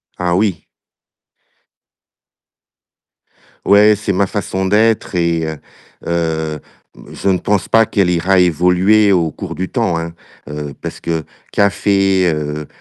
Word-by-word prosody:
Ah 90 -1 -1
oui. 95 -4 -1 3.0
Ouais, 105 +1 +5
c'est 105 -1 -3
ma 95 +1 +1
façon 95 -1 -3
d'être 105 0 +1
et 85 -2 0
heu, 80 -1 -5 0.5
heu, 80 -2 -2 0.4
mmh, - - -14
je 100 - -2
pense 100 +2 -1
pas 115 0 +4
qu'elle 100 -5 +1
ira 90 +2 +2
évoluer 90 +5 +3
au 85 -4 +1
cours - - -7
du 95 0 -4
temps, 110 -9 0
hein, 85 0 -5 0.4
heu, 75 -1 -6
parce - - -6
que 80 -1 -3 0.3
café, 95 -2 +2
heu, 75 0 -4
90 Hz, 125 wpm, -16 LUFS, 80-100 Hz, 3.0 s, Ouais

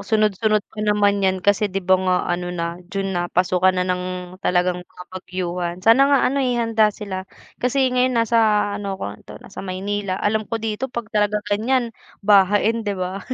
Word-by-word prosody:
Sunod-sunod 215 0 +1
pa 210 - -7
naman 205 -1 +2
'yan 190 -1 +1
kasi 205 +1 +3
di 190 -1 -4
ba 185 +1 +5
nga 185 -1 +2 0.2
ano 175 0 -3
na 170 0 -4
June 195 0 -3
na, 175 0 -1
pasukan 185 +1 +2
na 180 - +1
ng 180 0 -1 0.4
talagang 180 -1 +1
mga 180 0 -13
bagyuhan. 180 -2 -4
Sana 265 +5 +6
nga 280 -1 +4
ano, 275 +2 +1
eh, 250 -2 0
handa 225 -2 +3
sila. 195 -3 -6 0.3
kasi 260 +2 +1
ngayon 250 -1 +2
nasa 230 0 +2 0.4
ano 200 -2 -4
ko 100 - -5 0.2
'to - - -9
nasa - - -9
Maynila. 195 +1 -3
Alam 215 0 -1
ko 230 - -1
dito 225 +3 -3
pag 235 -2 -5
talaga 210 0 +2 0.2
gan'yan 235 +3 0 0.3
bahain 205 +3 +4
di 205 -3 -3
ba 185 +2 -4
200 Hz, 185 wpm, -21 LUFS, 185-220 Hz, 0.4 s, Sana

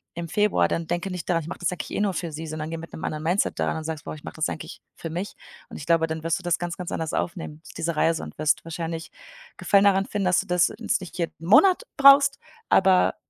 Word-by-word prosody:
im 170 -1 -5
Februar, 210 +4 +2
dann 165 -1 -2
denke 175 +3 -2
nicht 180 0 -6
daran: 165 -2 +1
„Ich - - -9
mache - - -7
das 175 0 0
eigentlich 180 - -6
eh - - 0
nur 200 -2 +1
für 170 -3 -4
sie“, 160 +2 -6
sondern 155 0 -5
gehe 165 0 -5
mit 165 - -11
anderen 155 -1 -4
Mindset 175 +5 0
daran - - 0
und 160 - -5
sage: 160 -2 -4
„Boah, - - -5
ich 150 - -14
mache - - -8
das 155 0 -1
eigentlich - - -7
für 165 - -6
mich.“ 180 +5 -4 0.3
und - - -8
ich 145 - -8
glaube, 165 -1 +3
dann 160 0 -5
wirst 165 +3 0
du - - -14
das 175 -1 +1
ganz, 175 -1 -3
ganz 180 -2 -6
anders 160 -1 -3
aufnehmen, 165 -3 -4 0.2
diese 165 -1 -2
Reise, 165 +1 +1
und - - -10
wirst 155 +1 +1
wahrscheinlich 165 0 -5 0.5
Gefallen 200 -1 +3
daran 195 -1 +4
finden, 205 -2 -2
dass 180 -1 +3
du - - -12
das 180 0 +3
jetzt - - 0
nicht 180 0 -9
jeden 165 -1 -4
Monat 370 - +6
brauchst, 275 0 +7 0.3
aber 190 -1 +4
170 Hz, 255 wpm, -25 LUFS, 160-185 Hz, 0.5 s, brauchst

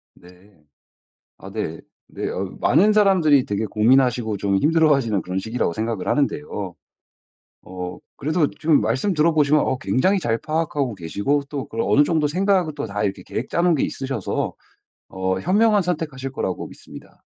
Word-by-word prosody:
네. 90 +3 -19 0.9
아 95 - -10
네. 100 -6 -4 0.3
네. - - -4
어 - - -3 0.2
많은 210 +5 +4
사람들이 180 -10 +4
되게 105 +2 -2
고민하시고 115 0 +2
좀 100 0 0
힘들어하시는 140 - +2
그런 90 +1 -3
시기라고 110 -2 -2
생각을 110 -1 -3
하는데요. 135 - -1 0.9
어 90 -1 -7 0.2
그래도 155 +1 +1
지금 155 -6 +2
말씀 125 - 0
들어 160 0 +3
보시면 150 0 +3
어 130 - 0
굉장히 185 +10 +1
잘 115 -7 0
파악하고 150 -6 -2
계시고 100 - -1
또 140 -3 -5
그런 115 - -2
어느 145 - +5
정도 155 -1 +1
생각을 180 0 +1
또 145 - -3
다 105 0 -3
이렇게 100 -2 -2
계획 120 - -5
짜놓은 170 0 +2
게 140 - 0
있으셔서 135 -7 -3 0.6
어 95 0 -2
현명한 205 +3 +3
선택하실 150 -6 -3
거라고 95 -8 -3
믿습니다. - - -14
135 Hz, 355 characters per minute, -22 LUFS, 105-155 Hz, 0.9 s, 어느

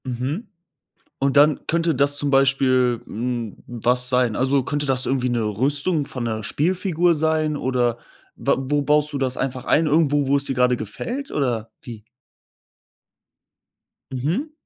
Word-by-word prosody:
Mhm. 130 - -4 0.7
Und 135 0 +1
dann 145 +1 +4
könnte 165 0 +1
das 140 +1 +2
zum 145 0 0
Beispiel, 130 -3 +3
hm, 120 -1 -4
was 125 +1 +1
sein? 125 -4 +1
Also, 135 +1 +2
könnte 145 +3 -2
das 130 -1 +1
irgendwie 130 -1 0
'ne 120 -1 0
Rüstung 140 - 0
von 125 -3 -5
'ner 110 -2 -3
Spielfigur 175 - +1
sein, 155 -1 0
oder 125 -3 0 0.4
wa - - +1
wo 145 +2 -1
baust 150 +1 +2
du 140 - -2
das 130 -1 -1
einfach 130 -1 -3
ein? 160 +2 +2
Irgendwo, 145 -2 +2
wo 140 - +3
es 140 - 0
dir 135 - -2
gerade 125 0 +2
gefällt 240 - -6
oder 120 -6 -1
wie? 115 -4 -10 2.1
Mhm. 165 - -2
135 Hz, 150 wpm, -22 LUFS, 125-150 Hz, 2.1 s, dann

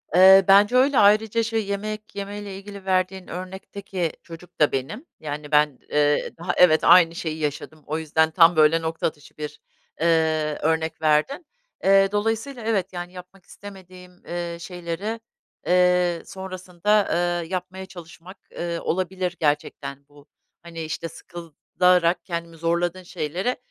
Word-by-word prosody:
Eee, 190 +1 +8
bence 205 +4 +6
öyle. 265 +2 +4
Ayrıca 215 +2 +4
şey, 225 -1 -1
yemek 210 +1 -5
yemeyle 200 0 -6
ilgili 200 0 -11
verdiğin 185 0 -1
örnekteki 185 -1 -5
çocuk 165 +1 -13
da 150 - +4
benim. 135 - -4
Yani, 150 0 -6
ben, 150 -3 +3
eee, 145 0 +1
daha 175 +1 -2
Evet, 160 -3 +5
aynı 170 -2 +6
şeyi 160 -2 -4
yaşadım. 150 0 -5
O 155 - -3
yüzden 160 0 +1
tam, 170 +1 +5
böyle, 155 +1 +4
nokta 160 0 -2
atışı 150 -1 -11
bir, 150 0 -7 0.4
eee, 160 -2 +1
örnek 160 +1 -1
verdin. 155 - +1 0.4
Eee, 195 0 +5
dolayısıyla 225 +4 -2
evet, 195 -4 -1
yani, 175 0 -6
yapmak 180 +1 -13
istemediğim, 185 -2 -14
eee, 175 -1 -4
şeyleri, 180 +5 -5 0.5
eee, 180 -1 +3
sonrasında, 190 +2 -1
ııı, 175 0 0
yapmaya 185 +2 -5
çalışmak, 180 0 -13 0.2
ııı, 170 -1 -3
olabilir 185 0 -2
gerçekten 140 -2 -2
bu. 145 0 -19 0.4
Hani, 170 -1 -8
işte, 160 +1 -5
sıkılarak 175 +2 0
kendimi 170 -2 -5
zorladığın 170 +2 -1
şeylere 180 +8 -3
175 Hz, 135 wpm, -23 LUFS, 160-195 Hz, 0.5 s, Eee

